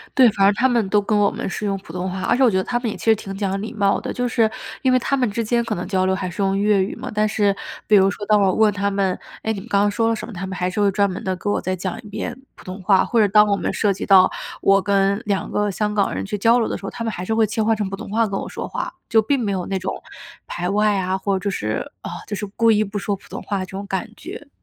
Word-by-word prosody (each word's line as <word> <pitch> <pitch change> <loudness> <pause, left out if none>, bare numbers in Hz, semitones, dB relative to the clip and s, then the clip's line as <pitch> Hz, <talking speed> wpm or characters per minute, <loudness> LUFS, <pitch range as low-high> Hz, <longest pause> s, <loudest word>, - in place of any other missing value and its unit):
对， 255 -3 +7
反 200 -2 +2
正 200 - +5
他 250 +5 +2
们 235 -5 +1
都 210 +1 +3
跟 210 +1 0
我 205 -1 +4
们 - - -4
是 210 - -4
用 195 -1 0
普 175 -4 -13
通 185 +1 -3
话， 185 +1 -5
而 - - +2
且 270 - +3
我 250 - +6
觉 190 - 0
得 190 - +1
他 240 +4 -1
们 240 -2 -2
也 - - -4
其 - - -9
实 225 -1 +5
挺 195 -2 -7
讲 195 -1 -2
礼 220 - -6
貌 200 -2 +2
的。 - - -5
就 245 0 -1
是 225 -2 +2 0.3
因 260 -3 +3
为 255 - +4
他 275 - 0
们 250 -4 +1
之 230 +3 -2
间 235 +2 +1
可 230 - -3
能 175 0 -5
交 185 -2 +1
流 190 0 +2
还 185 -1 -3
是 175 +3 -5
用 195 0 +1
粤 205 -1 +3
语 195 - -4
嘛， - - -7
但 215 0 +2
是 205 -2 +1 0.3
比 215 - +5
如 195 0 +6
说 205 +1 -5
当 210 0 +4
我 190 -2 +3
问 215 0 +3
他 200 0 0
们： 195 -2 0 0.3
“哎， 220 - 0
你 200 - -5
们 205 - -11
刚 200 -3 +3
刚 205 - +3
说 225 +2 +1
了 230 - +1
什 - - -6
么？” 230 - -10
他 190 +1 -5
们 185 -1 -5
还 180 0 0
是 185 - -4
会 200 -1 +3
专 200 0 +2
门 185 - -6
地 185 -1 -1
跟 205 +3 -2
我 - - +1
再 185 - -2
讲 185 0 -4
一 210 - -13
遍 215 +5 -5 0.2
普 - - -16
通 185 +2 -7
话。 190 0 +4
或 235 - +1
者 210 - +5
当 210 +1 +6
我 200 - +2
们 - - -2
涉 205 -2 +1
及 190 - -5
到 190 -1 +6 0.3
我 195 0 +4
跟 200 +1 +1
2 200 -2 -1
个 210 0 0
香 210 +2 -1
港 205 -2 +1
人 - - -3
去 205 +1 -3
交 230 +4 +4
流 225 - +1
的 - - -3
时 - - -16
候， - - -3
他 230 - -6
们 225 - -1
还 180 -2 -5
是 220 - -1
会 225 -1 +4
切 220 +1 -2
换 225 +1 +2
成 205 -2 -2
普 195 - -4
通 220 0 -9
话 225 +2 +1
跟 195 -1 -3
我 - - -5
说 - - -5
话. 345 -1 -4 0.2
就 225 -1 +5
并 275 +4 +1
没 215 -4 -1
有 185 -2 -2
那 195 - -1
种 185 - -4 0.4
排 175 +1 -3
外 210 +1 +2
啊， 185 +1 -1
或 190 0 -1
者 200 +2 -2
是， 110 - -3
呃， - - -5 0.2
就 205 - -3
是 205 - -4
故 225 +3 +2
意 215 0 +3
不 205 0 -4
说 200 0 -1
普 195 - -18
通 - - -7
话 200 -2 -3
这 185 - -3
种 195 +1 -6
感 195 +3 -2
觉。 280 +5 -10
205 Hz, 350 characters per minute, -21 LUFS, 195-220 Hz, 0.4 s, 对